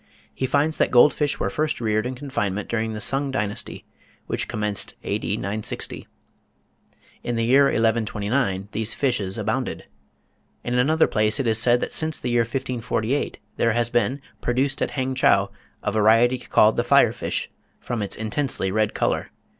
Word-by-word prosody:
He 130 - -2
finds 150 +4 +1
that - - +2
gold 125 +4 +6
fish 145 -2 -1
were - - -1
first 155 0 -1
reared 110 0 0
in 130 - -5
confinement 105 -7 -3
during 110 -1 -2
the 105 - -5
Sung 135 +5 -1
Dynasty, 105 -6 -3 0.4
which - - -3
commenced 105 -2 -3
A.D. - - -2
960. 105 +2 -4 1.1
In 120 - -3
the 115 0 0
year 135 +4 +5
1129 110 -3 0
these 110 0 -1
fishes 110 -9 0
abounded. - - -2 0.8
In 120 - -3
another 155 +5 +4
place 110 +4 +1
it 135 - 0
is 110 -1 +2
said 120 +1 +4
that - - -3
since 160 -1 -1
the 125 - -3
year 120 0 +3
1548 125 +1 -2 0.2
there 115 -1 +2
has 120 0 0
been 130 +3 0 0.2
"produced 135 +3 0
at - - +1
Hangchow 130 0 +2 0.3
a - - 0
variety 115 +4 +4
called 110 -2 +3
the - - +2
fire - - +4
fish, - - -3 0.3
from 120 -3 -4
its 100 - -3
intensely 110 -3 -2
red 110 +1 0
colour. - - 0
120 Hz, 160 wpm, -23 LUFS, 110-130 Hz, 1.1 s, gold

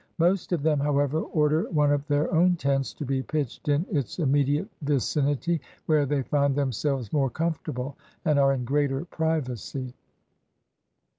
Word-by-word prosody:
Most 175 +2 +2
of 170 -5 0
them, 150 -2 +2
however, 145 +1 +1
order 155 0 +1
one 150 -4 +3
of 145 0 0
their 145 +3 +1
own 175 +2 +4
tents 135 -3 0
to 150 - -5
be 135 0 0
pitched 145 -2 -4
in 145 +4 +2
its 140 - -2
immediate 145 +2 +2
vicinity, 145 +3 0 0.2
where 150 -3 +3
they 140 -1 0
find 140 0 +1
themselves 135 -3 -1
more 140 -3 +2
comfortable 140 -3 -3 0.3
and 150 -3 +3
are 135 0 +4
in 125 -2 -3
greater 140 +2 0
privacy. 135 - -3
145 Hz, 150 wpm, -26 LUFS, 135-155 Hz, 0.3 s, own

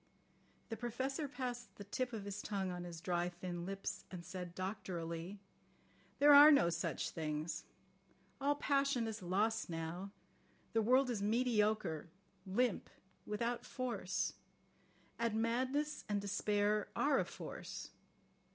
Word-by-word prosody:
The 225 - -3
Professor 260 +6 -2
passed 250 -3 -5
the 205 - -8
tip 245 +5 -2
of 215 -4 -5
his 205 0 -4
tongue 195 -3 -2
on 175 0 -5
his 170 -2 -7
dry, 175 0 0
thin 175 0 -5
lips, 195 0 -4
and 175 -2 -7
said 180 -1 -6
doctorally: 180 -2 -4 0.8
"There 290 +1 +8
are 290 +2 +11
no 275 - +5
such 170 - -1
things. 155 0 -3 0.8
All 285 +1 +3
passion 275 -4 +2
is 220 -1 -4
lost 210 +5 +1
now. 165 +4 -4 0.6
The 225 - +4
world 255 +3 +4
is 215 -4 -2
mediocre, 215 -7 +1 0.4
limp, 225 +3 +1 0.4
without 235 +3 -1
force. 255 -2 -2 0.9
And 230 -2 +1
madness 260 +6 0
and 205 -1 +1
despair 205 +1 +1
are 285 -1 +3
a - - +1
force. - - -7
210 Hz, 130 wpm, -37 LUFS, 180-245 Hz, 0.9 s, are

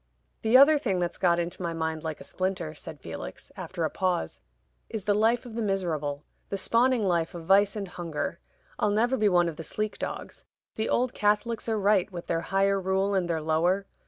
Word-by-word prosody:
"The 225 +3 +6
other 290 +3 +7
thing 195 -9 0
that's 175 -1 -2
got 175 -2 +3
into 175 +1 -3
my 170 -1 -2
mind 160 -1 -2
like 160 -2 -4
a - - -9
splinter," 185 -4 -3
said - - -9
Felix, - - -8
after 180 -2 -4
a 160 - 0
pause, 180 - -1 0.5
"is 220 -3 -4
the 205 +1 +2
life 225 +4 +2
of 240 - -9
the 230 - -3
miserable 160 -8 -2 0.2
the 200 - -2
spawning 235 +4 +2
life 170 -1 0
of 165 -1 -7
vice 195 +2 +4
and 200 -2 -4
hunger. 170 -4 -4 0.4
I'll 210 - +2
never 230 +5 +2
be 215 -4 +3
one 175 -2 +4
of 160 -3 -5
the 165 - -6
sleek 215 +5 -3
dogs. - - -6 0.3
The 220 - -2
old 250 0 +1
Catholics 215 +3 0
are 220 - +1
right, 200 -1 +3
with 175 -2 -7
their 165 0 -1
higher 195 +2 +1
rule 190 +2 +1
and 185 -3 0
their 160 -2 -1
lower. 175 +5 +1
190 Hz, 210 wpm, -27 LUFS, 170-210 Hz, 0.5 s, other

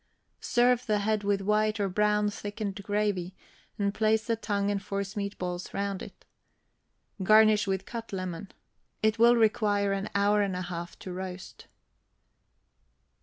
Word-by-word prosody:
Serve 245 0 +2
the 210 -1 +2
head 210 +1 0
with 200 -1 +1
white 215 +2 +1
or 200 - +1
brown 210 +2 +2
thickened 205 0 -5
gravy, 200 -3 -1 0.4
and 200 -1 0
place 220 0 +2
the 230 - +1
tongue 205 -2 -1
and 200 -1 -1
forcemeat 200 0 -4
balls 180 0 -5
round 200 -1 -2
it. - - -11 1.0
Garnish 215 +1 +5
with 190 -1 -1
cut 230 -1 -7
lemon. 185 0 -5 0.5
It 220 +1 +2
will 235 +1 +7
require 210 -3 +2
one 195 +1 -3
hour 205 +1 +3
and 195 -2 -1
a 180 - -3
half 175 -1 -6
to 185 - -8
roast. 185 0 -8
205 Hz, 145 wpm, -28 LUFS, 195-215 Hz, 1.0 s, will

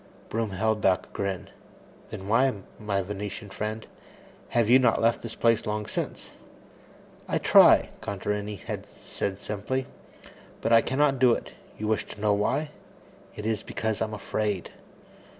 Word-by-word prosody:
Broom 115 -1 -1
held 105 +3 0
back 95 -1 +3
a - - -23
grin. 100 -2 -4 0.6
"Then 95 - -7
why, 125 +5 +4 0.3
my 100 -2 -1
Venetian 105 +1 -6
friend, 110 +2 -4 0.6
have 120 -2 +2
you 125 +3 +7
not 130 - +3
left 115 +1 +2
this 115 -1 -7
place 115 -1 +2
long 105 0 -2
since?" - - -5 1.0
"I - - +1
try," - - +6
Contarini 105 +1 -3
had 95 - -6
said 95 -1 -5
simply, 105 +6 -3 0.7
"but 115 - +1
I 115 - +8
cannot 135 +1 +1
do 125 -2 +6
it. - - -4 0.3
You 105 - -3
wish 110 0 +1
to - - -10
know 105 0 +3
why? 145 +9 0 0.6
It 105 - -6
is 110 -2 0
because 110 -1 -3
I - - +3
am 110 -1 -6
afraid." 105 -2 -2
105 Hz, 155 wpm, -27 LUFS, 100-115 Hz, 1.0 s, I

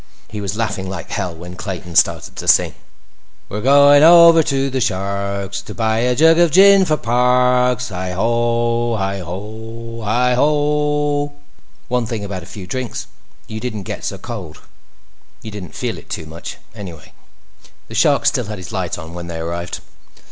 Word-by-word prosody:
He 105 -1 -6
was 100 +1 -4
laughing 100 -4 -2
like 95 -4 -7
hell 90 -3 -3
when 90 +2 -10
Clayton 90 -3 -6
started - - +2
to - - -6
sing. - - +4 0.8
"We're 105 - -4
going 145 +2 +6
over 170 0 +8
to 135 -2 -1
the 130 0 -1
Shark's 100 -2 -2
To - - -10
buy 110 -1 0
a 125 +1 +1
jug 160 +4 +5
of 170 -1 +5
gin 195 +3 +6
for 155 -3 +1
Parks! 125 0 +2
Hi 90 -1 -4
ho, 115 +2 0
hi 100 0 -2
ho, 110 +6 -8
hi 125 +4 +2
ho!" 145 +1 +1 0.5
One 125 -2 -1
thing 115 -3 -4
about 95 -2 -5
a 85 - -12
few 100 -4 -9
drinks; 125 +6 -4 0.4
you 110 0 -7
didn't 110 -4 -5
get - - -6
so - - -3
cold. 95 -10 -8 0.8
You 110 - -7
didn't 100 -4 -9
feel - - -3
it - - -18
too - - -5
much, 80 +2 -8 0.2
anyway. 90 -8 -10 0.7
The - - -11
Shark - - +3
still - - +2
had 105 0 -6
his 90 +4 -9
light 95 -4 -3
on 80 0 -9
when 85 0 -7
they 85 -1 -6
arrived. 85 +2 -5
115 Hz, 170 wpm, -18 LUFS, 95-125 Hz, 0.8 s, over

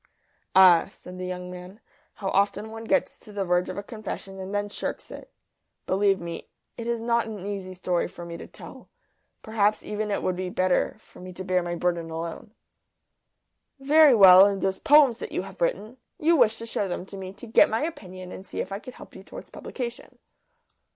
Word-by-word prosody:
"Ah," 185 -3 +7
said 180 0 -12
the 185 - -4
young 180 0 -6
man, 180 +3 -10 0.4
"how 195 -2 -4
often 200 +3 0
one 225 0 -8
gets - - 0
to 210 - -14
the 200 -2 -3
verge 180 0 +1
of - - -6
a 200 - -4
confession 215 -3 -7
and 190 +1 -6
then 205 0 -1
shirks 205 - -5
it! - - -11 0.5
Believe 195 0 +2
me, 170 -1 -7 0.3
it 230 - -6
is 235 -1 -1
not 235 -1 +1
an 210 -4 -7
easy 195 -2 -5
story 180 -1 -1
for 175 -1 -10
me 170 0 -7
to - - -9
tell. - - -13 0.5
Perhaps 215 -1 +1
even 210 0 -3
it 200 - -2
would 185 - 0
be 185 0 -4
better 185 0 +1
for - - -19
me 185 0 -9
to 185 - -7
bear 185 -1 +1
my 175 0 -3
burden 170 -1 -1
alone." 165 +6 -6 1.2
"Very 290 0 +6
well. 190 -2 +9
And 200 -1 -2
those 190 0 0
poems 280 -5 +5
that - - -6
you - - -2
have - - -12
written 265 - -1 0.2
you 330 +2 +3
wished 230 -6 +4
to 230 - -6
show 205 -3 -2
them 180 0 -4
to 195 - -11
me, 190 -1 -7
to 220 - -11
get 225 - +5
my 225 +6 -1
opinion 185 - -7
and - - -8
see - - -7
if - - -4
I 195 - -4
could 255 +3 -11
help - - -13
you - - -10
towards - - -11
publication." 240 -2 -7
195 Hz, 210 wpm, -26 LUFS, 185-225 Hz, 1.2 s, well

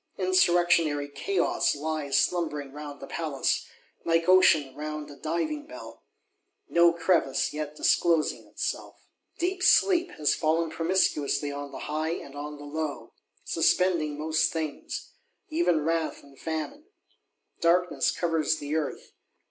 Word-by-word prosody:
Insurrectionary 175 -5 +3
Chaos 385 - 0
lies 150 -1 -1
slumbering 150 -6 -1
round 145 0 -8
the - - -8
Palace, 155 -5 -1 0.4
like 165 0 +1
Ocean 170 -7 +5
round 150 0 -5
a - - -11
Diving 170 - -3
bell,—no 170 - -2
crevice 165 -5 +1
yet 150 0 -5
disclosing 165 0 +1
itself. - - -5 0.3
Deep 370 +2 -1
sleep 365 -1 +4
has 150 -1 +1
fallen 160 +1 0
promiscuously 160 -5 +1
on 145 0 -6
the 135 - -8
high 155 +2 -1
and 140 -5 -8
on 145 +1 -6
the 145 - -10
low; 150 0 -5 0.3
suspending 165 -5 +1
most 160 +1 +1
things, 155 -3 -5 0.4
even 310 - +1
wrath 165 -1 -1
and 140 -1 -18
famine. 165 - -4 0.7
Darkness 175 +1 +2
covers 160 -2 0
the 145 +1 -4
Earth. 155 -3 -3
160 Hz, 125 wpm, -27 LUFS, 150-175 Hz, 0.7 s, Ocean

